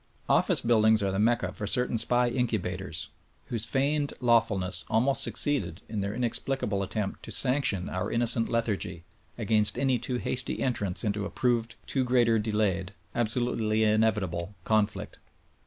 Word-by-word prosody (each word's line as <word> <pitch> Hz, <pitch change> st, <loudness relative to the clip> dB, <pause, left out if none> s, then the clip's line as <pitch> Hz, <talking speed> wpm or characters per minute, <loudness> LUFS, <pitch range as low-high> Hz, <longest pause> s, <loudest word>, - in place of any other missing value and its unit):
Office -, -, +3 dB
buildings 110 Hz, -2 st, +3 dB
are 100 Hz, -, 0 dB
the 95 Hz, -, -2 dB
mecca 110 Hz, -4 st, +1 dB
for 105 Hz, -, -5 dB
certain 125 Hz, +1 st, +1 dB
SPY 120 Hz, +2 st, +3 dB
incubators 95 Hz, -8 st, -3 dB, 0.4 s
whose 115 Hz, -2 st, -1 dB
feigned 145 Hz, +2 st, 0 dB
lawfulness 110 Hz, -6 st, +2 dB
alm.ost 130 Hz, +5 st, +2 dB
succeeded 140 Hz, -, -1 dB
in 110 Hz, -2 st, -4 dB
their 100 Hz, +2 st, -3 dB
inexpHcable 120 Hz, -4 st, -1 dB
attempt 100 Hz, 0 st, -4 dB
to -, -, -8 dB
sanction 125 Hz, -9 st, +2 dB
our 95 Hz, -, -3 dB
in 115 Hz, -, 0 dB
nocent 115 Hz, -1 st, +5 dB
lethargy 110 Hz, -7 st, -2 dB, 0.3 s
against 105 Hz, -2 st, +2 dB
any 130 Hz, -3 st, +1 dB
too 125 Hz, +2 st, -3 dB
hasty 125 Hz, -, -1 dB
entrance 105 Hz, -8 st, -2 dB
into 105 Hz, -1 st, -1 dB
a 100 Hz, -, -4 dB
proved 120 Hz, -2 st, -1 dB
too 135 Hz, -, 0 dB
greater 120 Hz, -3 st, +2 dB
delayed, 105 Hz, -3 st, -1 dB, 0.2 s
absolutely 115 Hz, -2 st, 0 dB
inevitable 105 Hz, -4 st, 0 dB
conflict. 110 Hz, -2 st, -1 dB
110 Hz, 145 wpm, -27 LUFS, 100-120 Hz, 0.4 s, nocent